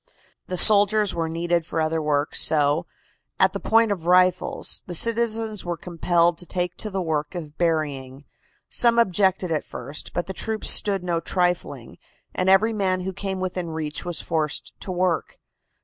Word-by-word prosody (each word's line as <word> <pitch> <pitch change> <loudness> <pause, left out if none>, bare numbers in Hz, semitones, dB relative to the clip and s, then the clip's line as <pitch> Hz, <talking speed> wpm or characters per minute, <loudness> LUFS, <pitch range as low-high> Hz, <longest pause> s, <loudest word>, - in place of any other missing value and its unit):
The 180 - -4
soldiers 205 0 +6
were 165 -1 -2
needed 170 +1 -1
for 160 - -4
other 160 0 -1
work, 150 -1 -1
so, 150 +2 +2 0.5
at - - +4
the - - -4
point 225 -1 +2
of 175 -4 -4
rifles, 180 0 +2
the 175 - -3
citizens 225 0 0
were 175 -1 -4
compelled 170 0 0
to 175 - -7
take 180 -1 -3
to 215 - -5
the 190 -2 -3
work 155 +1 -3
of 155 -4 -7
burying. 145 -5 -2 0.4
Some 235 -1 +2
objected 190 -4 +1
at 155 - -1
first, 140 +5 -8
but 175 - -3
the 190 - -6
troops 220 +3 0
stood 195 -3 +3
no 170 -2 -1
trifling, 180 0 -2 0.3
and 185 +1 0
every 215 +4 +4
man 190 -3 -1
who 190 +1 -5
came 195 0 -4
within 180 -2 -4
reach 155 -2 -4
was 175 -1 0
forced 155 -3 -3
to 190 - -6
work. 180 -2 -1
175 Hz, 170 wpm, -23 LUFS, 160-195 Hz, 0.5 s, soldiers